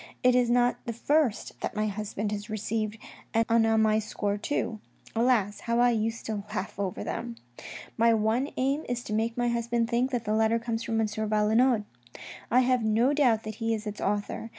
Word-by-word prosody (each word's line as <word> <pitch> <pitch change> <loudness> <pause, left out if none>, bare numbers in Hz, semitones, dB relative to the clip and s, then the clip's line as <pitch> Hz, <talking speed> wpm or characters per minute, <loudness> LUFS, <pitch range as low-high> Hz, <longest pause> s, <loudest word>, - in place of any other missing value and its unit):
It 250 0 +5
is 245 -1 +3
not 245 0 +2
the 235 - -2
first 280 0 0
that - - -3
my 215 0 0
husband 210 0 -3
has 210 0 -5
received, 215 0 -2 0.4
and 225 0 +3
on 225 -1 +4
my 215 0 +3
score 205 -1 -2
too. 220 0 -2 0.4
Alas! 225 -4 +2
how 235 0 -1
I 245 0 +5
used 225 0 -2
to 210 -2 -3
laugh 190 +1 -4
over 195 -2 -2
them! 120 - -4 0.3
" - - -11
My 230 +1 +5
one 225 +5 +1
aim 275 +4 0
is 245 0 -2
to 215 - -5
make 225 +2 -1
my 240 0 +1
husband 235 0 -1
think 245 +2 +2
that 245 -4 -2
the 210 - 0
letter 220 +1 +3
comes 230 -1 -3
from 225 -1 -1
M. 225 - +3
Valenod; 215 +2 +2 0.7
I 250 +3 +5
have 255 -1 +2
no 225 +6 +3
doubt 245 -7 +3
that 215 -1 -6
he 225 0 +1
is 215 0 -7
its 210 0 -5
author. 205 +2 -2
225 Hz, 200 wpm, -28 LUFS, 215-240 Hz, 0.7 s, It